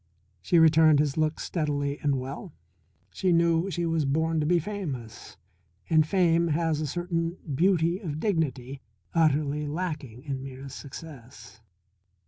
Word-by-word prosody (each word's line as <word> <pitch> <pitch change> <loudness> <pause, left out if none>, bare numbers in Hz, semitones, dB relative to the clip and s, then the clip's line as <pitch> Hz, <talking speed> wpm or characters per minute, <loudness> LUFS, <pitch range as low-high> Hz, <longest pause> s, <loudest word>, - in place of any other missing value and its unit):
She 170 - +2
returned 160 -1 +6
his 145 -2 +1
look 155 0 0
steadily 145 -3 -2
and 140 -2 0
well. 140 +6 -7 0.6
She 185 -2 0
knew 170 +1 +3
she 175 -2 -2
was 165 -1 +1
born 160 +3 +1
to 150 - 0
be 175 +2 +4
famous, 155 - -6 0.5
and 155 -1 +4
fame 170 -2 +3
has 160 -1 0
a 155 - -2
certain 170 +2 -2 0.2
beauty 170 +2 +2
of 155 -7 -5
dignity 140 - -2 0.3
utterly 150 -2 +1
lacking 150 -7 -4
in 135 -3 -4
mere 135 0 -8
success. 130 -5 -11
155 Hz, 135 wpm, -27 LUFS, 140-170 Hz, 0.6 s, returned